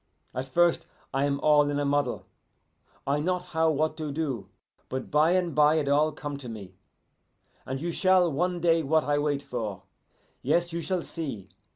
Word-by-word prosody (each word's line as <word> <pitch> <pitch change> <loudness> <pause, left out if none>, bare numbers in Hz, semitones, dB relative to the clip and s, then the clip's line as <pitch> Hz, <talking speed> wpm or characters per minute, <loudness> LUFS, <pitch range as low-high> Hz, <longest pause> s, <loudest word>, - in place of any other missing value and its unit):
At 130 +1 -4
first 170 +5 +2 0.3
I 135 +1 +1
am 140 -1 0
all 150 -1 +4
in 145 - -1
a 145 - 0
muddle, 145 0 0 0.8
I 140 +2 +1
not 180 +3 -1
how 160 0 +3
what 155 +1 0
to 155 -2 -4
do; 140 -7 -3 0.4
but 130 0 -5
by 155 +3 +4
and 180 -3 +1
bye 150 +1 +5
it 155 -3 0
all 150 +2 +3
come 145 -1 -6
to 130 -3 -8
me, 100 -5 -9 0.9
and 130 +1 -3
you 170 +4 -2
shall 185 -1 +3
one 175 +5 0
day 165 -1 +3
what 155 +1 +2
I 145 0 +1
wait 145 -1 -1
for. 115 -8 -5 0.6
Yes, 170 +5 +1
you 170 - -2
shall 180 0 -2
see. 125 - -6
150 Hz, 185 wpm, -27 LUFS, 140-165 Hz, 0.9 s, bye